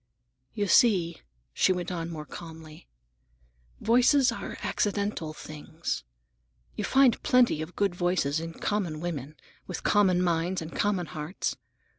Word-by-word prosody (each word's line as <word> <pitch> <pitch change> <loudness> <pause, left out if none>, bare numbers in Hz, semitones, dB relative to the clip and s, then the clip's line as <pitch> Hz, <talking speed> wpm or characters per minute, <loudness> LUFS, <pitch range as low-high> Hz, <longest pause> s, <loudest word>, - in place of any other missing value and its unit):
"You 205 -2 0
see," 180 -5 +4 0.3
she - - +3
went 180 -1 -2
on 170 -2 -3
more 155 -2 -6
calmly, 160 -1 -11 0.9
"voices 250 +3 +4
are 235 - -6
accidental 200 -6 -1
things. 155 - -6 0.7
You - - -3
find 265 -3 +4
plenty 250 - +3
of 160 +3 -7
good 200 -3 +1
voices 175 -5 0
in 165 0 -6
common 185 -7 -2
women, 155 -4 -5 0.3
with 180 - -5
common 190 -4 +4
minds 175 +1 0
and 160 0 -7
common 200 -4 +1
hearts. 155 +3 -4
175 Hz, 130 wpm, -28 LUFS, 160-205 Hz, 0.9 s, see